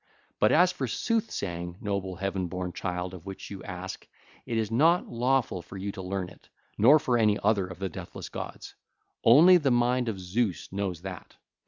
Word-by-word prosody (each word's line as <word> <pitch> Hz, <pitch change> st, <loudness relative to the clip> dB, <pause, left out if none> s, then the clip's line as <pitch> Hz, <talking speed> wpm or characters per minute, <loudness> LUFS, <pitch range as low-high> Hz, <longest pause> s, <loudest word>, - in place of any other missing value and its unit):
But 105 Hz, -, +4 dB
as 180 Hz, +3 st, +5 dB
for 140 Hz, -8 st, -3 dB
sooth 225 Hz, -, 0 dB
saying, 85 Hz, -2 st, -4 dB
noble, 100 Hz, -2 st, -3 dB
heaven 95 Hz, 0 st, -2 dB
born 90 Hz, 0 st, -4 dB
child, 90 Hz, 0 st, -3 dB
of 90 Hz, 0 st, -10 dB
which 95 Hz, +1 st, -8 dB
you 95 Hz, -2 st, -7 dB
ask, 95 Hz, 0 st, -7 dB, 0.4 s
it 115 Hz, -, -1 dB
is 110 Hz, -1 st, -1 dB
not 165 Hz, +9 st, +4 dB
lawful 120 Hz, -5 st, 0 dB
for 90 Hz, +3 st, -11 dB
you 100 Hz, +2 st, -3 dB
to 95 Hz, -, -8 dB
learn 95 Hz, -1 st, -3 dB
it, -, -, -19 dB, 0.3 s
nor 130 Hz, +9 st, +7 dB
for 125 Hz, -5 st, +1 dB
any 105 Hz, -2 st, +3 dB
other 100 Hz, -3 st, +2 dB
of 90 Hz, -2 st, -9 dB
the 95 Hz, +1 st, -2 dB
deathless 95 Hz, -2 st, -8 dB
gods: -, -, -7 dB, 0.5 s
only 165 Hz, +10 st, +8 dB
the 145 Hz, -5 st, +1 dB
mind 120 Hz, 0 st, +2 dB
of 100 Hz, -4 st, -4 dB
Zeus 95 Hz, -2 st, -2 dB
knows 95 Hz, -4 st, -3 dB
that. 95 Hz, -2 st, -8 dB
100 Hz, 190 wpm, -28 LUFS, 90-120 Hz, 0.5 s, only